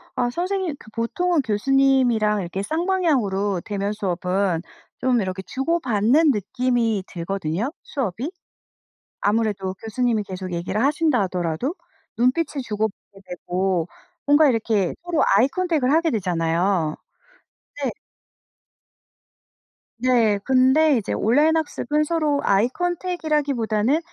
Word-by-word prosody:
아 245 -1 +1
선생님 360 +3 -2
그 - - -15
보통은 310 +9 0
교수님이랑 240 -2 +2
이렇게 185 +2 -4
쌍방향으로 265 - 0
대면 200 0 -2
수업은 185 -2 -1 0.4
좀 250 -3 +2
이렇게 190 -1 -3
주고받는 270 - +2
느낌이 230 -1 0
들거든요, 180 - -3
수업이. 255 - -3 0.9
아무래도 205 -3 0
교수님이 225 0 0
계속 185 -2 -6
얘기를 175 +5 -2
하신다 300 -2 +2
하더라도 180 - -2 0.4
눈빛을 275 +4 +1
주고받게 210 -2 -4
되고 180 -1 -1 0.4
뭔가 290 +1 +6
이렇게 220 -6 +1
서로 345 -2 0
아이컨택을 290 0 +1
하게 325 +1 +3
되잖아요. 175 - 0 0.9
네. - - 0 2.1
네. 235 -4 +3
근데 265 +4 +4
이제 215 - -3
온라인 295 +9 +3
학습은 300 -1 -1
서로 305 -2 0
아이컨택이라기보다는 285 - 0
230 Hz, 285 characters per minute, -22 LUFS, 195-290 Hz, 2.1 s, 뭔가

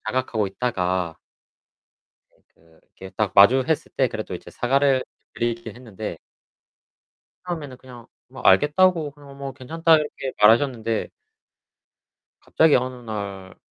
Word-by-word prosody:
자각하고 120 -5 -1
있다가 90 -6 -2 1.2
네 - - -33 0.2
그 80 0 -26 0.2
이렇게 95 0 -9
딱 105 -3 0
마주했을 130 +9 +4
때 - - +2
그래도 - - -6
이제 - - -11
사과를 135 +1 +2 0.3
드리긴 115 0 -3
했는데 110 -7 -7 1.3
처음에는 150 -7 -5
그냥 125 -3 -14 0.2
뭐 - - -11
알겠다고 160 0 +3
그냥 140 -1 -15
뭐 135 -1 -6
괜찮다 165 +5 +2
이렇게 150 -3 -4
말하셨는데 115 0 +3 1.3
갑자기 160 -2 +3
어느 125 0 -1
날 100 -3 -6
125 Hz, 275 characters per minute, -23 LUFS, 105-140 Hz, 1.3 s, 마주했을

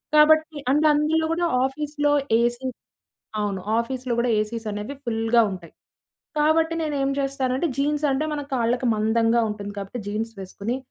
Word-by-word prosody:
కాబట్టి 315 +1 +5 0.2
అండ్ 300 +3 +4
అందులో 310 +2 +2
కూడా 345 +1 +1 0.2
ఆఫీస్‌లో, 290 +1 -1 0.3
ఏసీ 240 +2 -1 0.8
అవును. 200 -2 -2 0.2
ఆఫీస్‌లో 255 +1 -3
గూడా 240 0 +1
ఏసీసనేవి 215 +2 -4
ఫుల్‌గా 225 0 +2
ఉంటాయి. 180 -4 -9 0.7
కాబట్టి 320 +2 +3
నేను 300 -2 -2
ఏం 270 - +1
చేస్తానంటే, 270 +2 -1
జీన్స్ 295 +1 +1
అంటే 270 +3 0
మన 295 - -2
కాళ్ళకి 245 +1 0
మందంగా 225 +2 +2
ఉంటుంది. 205 -1 -6
కాబట్టి, 200 +5 -6
జీన్స్ 220 +2 -3
వేసుకొని, 200 +6 -4
255 Hz, 140 wpm, -24 LUFS, 225-295 Hz, 0.8 s, కాబట్టి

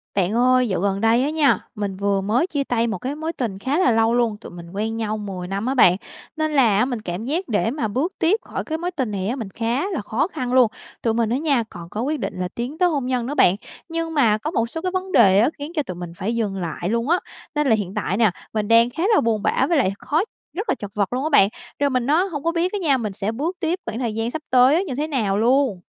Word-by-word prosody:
Bạn 195 0 +1
ơi, 250 +1 +3
dạo 190 -5 -1
gần 200 +1 0
đây 230 +3 +4
á 285 - 0
nha, 305 -2 +3 0.2
mình 205 -3 -3
vừa 200 0 0
mới 225 - +1
chia 285 -6 -1
tay 235 -3 0
một 225 - -2
cái 265 +3 -4
mối 315 +2 -4
tình 220 - -3
khá 275 - 0
là 265 - +4
lâu 225 0 +3
luôn, 235 -3 +1
tụi - - -10
mình 170 -1 -10
quen 220 +3 -2
nhau 215 -1 -2
10 195 -4 -6
năm 195 +3 -3
á 260 - 0
bạn, 180 -8 +6 0.4
nên 310 0 0
là 245 -9 +4
á, 215 - +3
mình 245 -4 -3
cảm 185 +3 -5
giác 330 +8 -2
để 225 0 +1
mà 265 -5 -2
bước 270 - -1
tiếp 375 +5 +3
khỏi - - -5
cái 315 - -3
mối 350 +2 -3
tình 260 -10 -2
này 195 -1 -2
á, 240 - -1
mình 225 -7 -5
khá 235 - -1
là 340 - -2
khó 225 +9 -1
khăn 255 -9 -4
luôn. 250 -4 +5 0.3
Tụi 225 - +1
mình 230 -1 +1
á 240 - +1
nha, 280 -5 +1
còn 170 -2 -10
có 210 - -4
quyết 295 +4 -1
định - - -4
là 180 - -1
tiến 250 +6 -4
tới 360 0 +3
hôn 285 -6 -1
nhân 250 -2 0
nữa 280 +4 -3
bạn, 180 - +5 0.3
nhưng 330 0 -3
mà 235 -8 +3
có 300 +9 -4
một 230 -8 0
số 325 - -5
cái 365 +1 -2
vấn 375 0 -3
đề 195 - +6
á 230 - +4
khiến 290 +2 -6
cho 300 - +1
tụi 185 -8 -6
mình 175 -1 -7
phải 225 +5 -2
dừng 210 -4 -1
lại 170 +1 -3
luôn 230 +4 0
á. 350 +2 +4 0.4
Nên 295 -1 +1
là 225 - +5
hiện 200 -3 -4
tại 190 - -1
nè, 220 -4 +4 0.2
mình 215 -1 -1
đang 230 +2 +5
khá 325 +7 -4
là - - +4
buồn 225 -2 0
bã - - +2
với 340 - +3
lại 220 -9 +2
khó 305 +4 +1 0.3
rất 405 +7 -4
là - - +2
chật 205 -1 -8
vật 205 +2 0
luôn 255 +2 -1
á 310 - 0
bạn, 200 -10 +5 0.3
rồi 285 0 +2
mình 255 -2 0
á 315 +5 +4
hổng 290 -3 -4
có 335 - +1
biết 340 +2 0
á 410 - -1
nha, 285 -6 +3
mình 215 -5 -3
sẽ 195 +2 -2
bước 310 +10 -3
tiếp 340 +2 -1
khoảng 225 - -4
thời 235 -4 -2
gian 225 +1 -1
sắp 315 - -4
tới 260 +9 +5
như 270 - -4
thế 295 +3 -1
nào 220 -10 0
luôn. 240 -3 +2
240 Hz, 290 wpm, -22 LUFS, 210-295 Hz, 0.4 s, bạn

